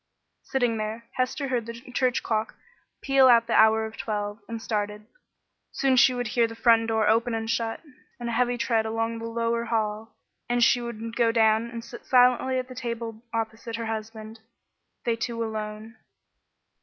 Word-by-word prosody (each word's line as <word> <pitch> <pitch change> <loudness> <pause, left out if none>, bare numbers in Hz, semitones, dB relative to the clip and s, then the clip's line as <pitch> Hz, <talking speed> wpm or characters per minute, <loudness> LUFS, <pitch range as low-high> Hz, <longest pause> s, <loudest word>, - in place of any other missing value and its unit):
Sitting 245 -4 0
there, 220 +2 -4
Hester 260 +2 -2
heard 240 -3 -1
the 230 - -5
church 250 +1 -1
clock 220 0 -1 0.5
peal 270 -1 +5
out 235 -2 +6
the 230 - -2
hour 220 0 +5
of 220 0 -9
twelve, 205 -1 -3
and 230 0 -5
started. 210 -1 -3 0.7
Soon 270 -1 +2
she 255 - +6
would 245 -2 -2
hear 235 -1 +2
the 225 - -9
front 225 -1 +4
door 220 -1 +1
open 230 +2 +2
and 225 0 -3
shut, 225 0 -2 0.4
and 240 - -4
a - - -2
heavy 245 +1 +1
tread 225 -2 +1
along 225 +1 -2
the 230 - -6
lower 230 0 -1
hall, 220 -1 -2 0.3
and 240 0 +2
she 245 +1 +4
would 230 -1 -6
go 235 -1 +3
down 225 0 +3
and 230 -1 -7
sit 240 +1 -10
silently 255 +1 +4
at 255 0 -2
the 255 - -9
table 230 -3 -5
opposite 225 +1 -4
her 230 0 -4
husband, 220 0 -6 0.7
they 235 - +1
two 230 0 -3
alone. 215 +1 -6
230 Hz, 180 wpm, -26 LUFS, 220-240 Hz, 0.7 s, out